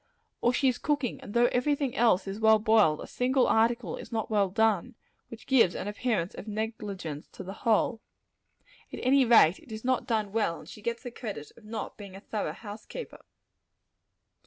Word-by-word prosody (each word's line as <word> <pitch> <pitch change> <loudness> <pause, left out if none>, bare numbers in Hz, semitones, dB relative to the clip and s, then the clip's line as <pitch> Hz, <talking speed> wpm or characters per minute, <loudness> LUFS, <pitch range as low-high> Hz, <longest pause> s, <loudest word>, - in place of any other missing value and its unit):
Or 240 - +3
she 270 +2 +1
is 250 -1 +1
cooking; 285 -5 -1
and 205 - -10
though 240 0 +5
every 285 +4 +2
thing 275 -3 -3
else 225 -7 +3
is 195 +2 -5
well 220 0 +6
boiled, 215 -8 +3
a - - -6
single 255 +1 +1
article 225 -4 +1
is - - -10
not 220 -1 -3
well 200 -3 +2
done 220 +2 +1 0.3
which 230 - -11
gives 235 -10 +4
an 190 - -4
appearance 205 -4 -1
of - - -9
negligence 205 -8 -5
to - - -8
the 190 - -7 0.2
whole. 220 +1 +2 0.9
At - - -6
any 265 +1 +4
rate, 220 -7 +6
it 295 -8 -17
is 220 +2 -7
not 255 +1 +1
done 215 -4 0
well; 210 -6 0
and - - -15
she 210 - -11
gets 235 +3 -3
the 245 - -6
credit 210 - -7
of 225 - -18
not 220 +1 -6
being 200 -2 -10
a - - -8
thorough 205 -6 -4
house 210 +3 -10
keeper. - - -8
220 Hz, 200 wpm, -28 LUFS, 205-245 Hz, 0.9 s, well